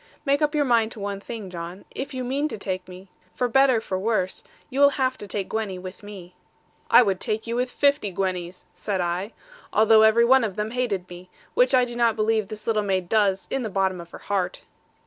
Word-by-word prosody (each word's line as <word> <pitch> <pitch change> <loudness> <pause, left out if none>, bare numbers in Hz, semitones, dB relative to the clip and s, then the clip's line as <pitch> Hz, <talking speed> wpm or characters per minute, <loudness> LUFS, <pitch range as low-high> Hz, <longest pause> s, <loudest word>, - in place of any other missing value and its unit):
Make 280 +1 +2
up 300 0 +1
your 290 -1 +2
mind 230 -3 +2
to 225 - -11
one 200 0 -4
thing, 210 -2 -7
John; 175 +2 -7
if 275 +2 -5
you 260 -2 -4
mean 275 +4 -1
to 300 - -6
take 185 -2 -4
me, 185 +1 -12 0.3
for 250 - 0
better 260 0 +4
for 190 -4 -3
worse, 195 -3 -1 0.2
you 265 - -4
will 285 0 +8
have 260 -1 +1
to 205 - -7
take 195 0 -3
Gwenny 215 -4 -3
with 185 +1 -9
me. 195 -4 -11 0.6
'I - - +8
would 195 -4 0
take 215 +2 -2
you 230 0 -3
with 250 +1 0
fifty 280 -5 +2
Gwennies,' 180 -1 -3
said 200 -3 -3
I, 180 +4 -2 0.4
'although 220 +1 +5
every 220 +2 +5
one 260 +1 +5
of 205 -4 -2
them 215 +1 -3
hated 225 -7 -2
me, 180 +1 -11 0.2
which - - +4
I 250 -1 +4
do 240 -1 -8
not 235 -2 +2
believe 215 -1 +1
this 215 +1 -9
little 220 -2 +1
maid 190 -3 -1
does, 200 -3 +2
in 270 - 0
the 225 - -3
bottom 190 -2 0
of 170 - -13
her - - -10
heart.' 195 -3 -3
215 Hz, 225 wpm, -24 LUFS, 190-245 Hz, 0.6 s, will